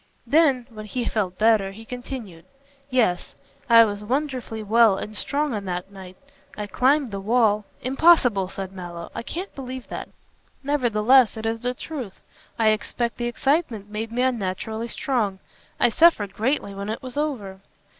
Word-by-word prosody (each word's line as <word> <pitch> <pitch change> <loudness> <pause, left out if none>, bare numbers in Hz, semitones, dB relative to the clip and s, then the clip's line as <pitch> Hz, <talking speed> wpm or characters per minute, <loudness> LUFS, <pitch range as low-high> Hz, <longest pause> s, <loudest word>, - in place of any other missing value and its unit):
Then, 275 -2 +3
when 215 -1 -9
he 245 +2 -3
felt 190 -6 -1
better, 215 -3 +3
he 220 +3 -11
continued 245 -8 -8 0.4
"Yes! 230 -9 +1 0.3
I 230 -1 +8
was 205 -1 -4
wonderfully 255 -2 -2
well 220 -1 +5
and 210 +2 -6
strong 290 +5 -1
on 205 -2 -4
that 180 +1 -4
night. 185 -2 -11 0.4
I 210 - -3
climbed 260 +4 +2
the 200 - -4
wall 215 0 +2
" - - -34
"Impossible!" 255 - +4
said 190 0 -6
Mallow, 175 -3 -8
"I - - -4
can't 355 +11 -6
believe 260 -2 -7
that." - - -6 0.5
"Nevertheless 250 -4 +3
it 220 - -5
is 225 0 -1
the 250 0 -1
truth. 255 -9 -7 0.4
I 225 -2 +4
expect 235 +2 -1
the 240 - -2
excitement 240 - -1
made 220 +1 -4
me 245 +2 0
unnaturally 220 -1 -2
strong. 230 -7 -1 0.4
I - - +5
suffered 225 - +4
greatly 225 -2 -1
when 200 +1 -5
it 220 - -4
was 255 -1 -6
over." 245 -11 -3
225 Hz, 165 wpm, -24 LUFS, 205-255 Hz, 0.5 s, I